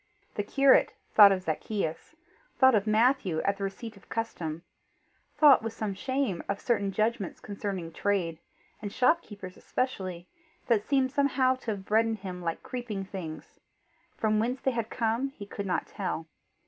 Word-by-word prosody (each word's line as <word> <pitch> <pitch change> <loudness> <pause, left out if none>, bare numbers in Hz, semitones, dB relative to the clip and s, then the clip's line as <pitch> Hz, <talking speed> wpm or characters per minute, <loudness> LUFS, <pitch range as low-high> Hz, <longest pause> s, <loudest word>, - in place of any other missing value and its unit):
The - - -1
curate 275 +6 +4 0.2
thought 205 -2 +9
of 185 -1 0
Zacchaeus; 165 - -3 0.4
thought 260 -1 +6
of 215 -1 +2
Matthew 215 - +3
at 200 0 0
the 200 - -5
receipt 220 +3 -5
of 200 - -19
custom; 170 -8 -4 0.7
thought 290 -4 +7
with 225 0 -4
some 215 -3 -3
shame 260 -3 -1
of 200 0 -1
certain 210 -6 0
judgments 215 -2 -1
concerning 195 -5 -5
trade, 175 -5 -1 0.4
and 205 -1 -5
shopkeepers 210 - 0
especially, 185 -9 -3 0.4
that 225 -4 +2
seemed 265 -2 +2
somehow 275 -2 +2
to - - -19
have 200 -3 -3
bred 220 +2 +3
in 225 - -1
him 185 -3 -7
like 165 -1 -3
creeping 230 -6 -5
things 180 -5 -8 0.6
for 220 - +1
whence 230 +5 +1
they 265 - +1
had 230 -3 -3
come 230 +3 0
he 215 -7 -10
could 200 0 -6
not 180 - 0
tell. 180 -4 -4
210 Hz, 160 wpm, -29 LUFS, 190-245 Hz, 0.7 s, thought